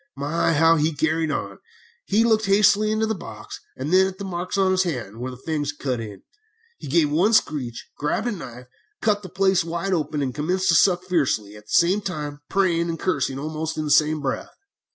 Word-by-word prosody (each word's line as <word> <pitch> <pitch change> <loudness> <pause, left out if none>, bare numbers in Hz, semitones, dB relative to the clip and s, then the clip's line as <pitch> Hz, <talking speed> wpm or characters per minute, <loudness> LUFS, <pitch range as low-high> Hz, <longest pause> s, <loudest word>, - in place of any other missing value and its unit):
"My, 150 +4 0
how 165 +2 +5
he 155 +1 0
carried 160 +1 0
on! - - -4 0.5
He 210 +3 +2
looked 220 -2 +2
hastily 205 +1 +4
into 215 0 +1
the 220 - -1
box, 110 - -9 0.2
and 140 +6 -3
then 190 0 +6
at 190 -1 -7
the 200 - -6
marks 180 +1 -4
on 190 -1 +3
his 185 0 +3
hand, 120 - -4
where 125 +1 -4
the 125 - -9
fangs 145 +1 -3
had 145 - -5
cut 130 -4 -2
in. 105 -4 -8 0.6
He - - -8
gave 150 +1 +2
one 185 +9 +3
screech, 135 - 0
grabbed 150 +9 -1
a 240 - 0
knife, 125 - -8 0.3
cut 210 -2 +1
the 185 - -9
place 190 +1 +2
wide 170 +3 -2
open, 150 -3 -1
and 130 -2 -2
commenced 180 +6 -1
to - - +5
suck 180 0 +4
it 185 - -20
fiercely, 130 - 0
at 105 0 -14
the - - -9
same 185 +5 +4
time 150 -6 -5
praying 170 -3 +1
and 165 - -3
cursing 135 -7 -1
almost 155 +2 -4
in 155 - -2
the 150 - -2
same 155 +1 +3
breath. 135 -2 -3
165 Hz, 220 wpm, -23 LUFS, 145-190 Hz, 0.6 s, then